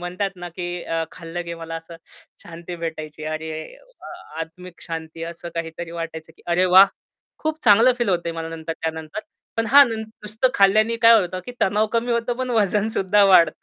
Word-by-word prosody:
म्हणतात 185 +3 -2
ना, 175 0 -7
की 175 +1 -5
अ, 165 0 -1
खाल्लं, 175 0 -6
की 170 - -5
मला 165 0 -7
असं 165 +1 -10 0.5
शांती 170 +1 -8
भेटायची. 155 -2 -6
अरे, 155 0 -4 0.5
वाह! - - -9 0.3
आत्मिक 170 +2 -9
शांती 165 0 -6
असं 170 0 -8
काहीतरी 165 0 -5
वाटायचं, 165 -1 -7
की - - -22
अरे, 175 +2 +2
वाह, 190 +2 +8 0.5
खूप 315 0 -3
चांगलं 230 +5 +6
फील 240 -4 0
होतं 175 -2 +1
आहे, - - -2
मला 165 0 -4
नंतर, 160 0 -5
त्यानंतर. 160 +3 -4 0.4
पण 225 0 0
हां, 285 +4 +8
न - - -3
नुसतं 220 +2 -2
खाल्याने 215 +4 +4
काय 230 0 +7
होतं, 185 0 -4
की 245 - -6
तणाव 210 +3 +2
कमी 235 +1 0
होतो 235 +1 0
पण 255 0 -3
वजन 210 -1 +2
सुद्धा 205 -1 +3
वाढतं. 185 -4 +5
175 Hz, 190 wpm, -22 LUFS, 165-215 Hz, 0.5 s, वाह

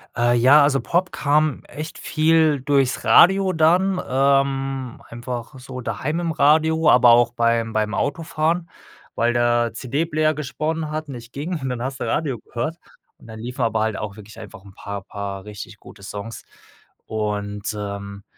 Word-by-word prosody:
Äh, 120 0 +2
ja, 135 +5 +6
also 140 -1 +2
Pop 180 +2 0
kam 150 0 +1
echt 155 +2 -7
viel 155 -2 +2
durchs 135 -2 +1
Radio 195 +1 +5
dann, 180 +4 +3
ähm, 135 -1 0
einfach 120 +1 -6
so 130 0 -8
daheim 140 +7 -3
im 170 -1 -1
Radio, 160 +1 +3
aber 125 -1 +6
auch 120 0 +4
beim 115 -1 +1
beim 110 +1 0
Autofahren, 160 +3 -1 0.5
weil 120 +1 +1
der 120 -1 +2
CD-Player 155 +6 0
gesponnen 155 +2 -3
hat 155 0 -4
und 140 - -7
nicht 120 0 -11
ging 160 +4 -4
und 135 -2 -4
dann 125 -1 -4
hast 135 +1 -4
du - - -3
Radio 140 -7 -1
gehört. 120 +10 -5 0.4
Dann 110 -1 -11
liefen 125 +3 -4
aber 110 -1 0
halt 110 -1 -1
auch 105 -1 -5
wirklich 110 +1 -13
einfach 110 -2 -11
'n 100 -1 -15
paar 100 0 -6
paar 100 -1 -6
richtig 105 +1 -9
gute 100 - -15
Songs. 105 +3 -7 0.6
Und, 105 -1 -3
ähm 100 -1 -6
130 Hz, 165 wpm, -22 LUFS, 110-155 Hz, 0.6 s, ja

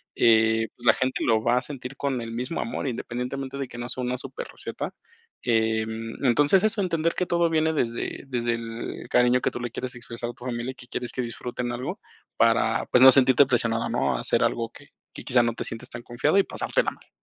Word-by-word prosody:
eh, 110 -1 +4
pues, 120 - -13
la - - +8
gente 130 0 -1
lo 110 -1 +3
va 120 +1 +3
a - - +2
sentir 130 -1 -7
con 135 -3 -1
el 115 0 -6
mismo 125 +7 -3
amor, 120 +4 -3
independientemente 130 +3 -4
de 135 - -3
que - - -10
no 120 0 -4
sea 130 - -3
una 125 0 -1
superreceta. 135 +1 -6 0.5
Em, 110 0 0
entonces, 145 - +4
eso 215 -1 +1
entender 165 -2 0
que 180 - 0
todo 170 -1 +2
viene 160 0 +2
desde 120 -2 -2
desde 120 -2 0
el 115 0 -6
cariño 125 0 +4
que - - 0
tú 120 - -6
le 120 -2 -4
quieres 130 0 -5
expresar 120 0 -6
a - - -18
tu 125 - -12
familia, 120 +1 -3
y - - -15
que 125 - -13
quieres 120 -1 -4
que 130 - -2
disfruten 120 +1 -4
algo 120 +1 -4 0.4
para, - - +3
pues, 125 - +5
no 130 - +11
sentirte 130 +1 +5
presionado, 115 -2 +1
¿no?, - - 0
a - - -4
hacer - - +3
algo 115 -1 0
que 145 - -15 0.2
que - - -9
quizás 125 -2 +3
no 120 - 0
te - - -4
sientes 115 - -5
tan 120 0 -8
confiado 135 +9 +1
y 195 - +6
pasártela - - 0
mal. - - -18
125 Hz, 225 wpm, -25 LUFS, 115-135 Hz, 0.5 s, no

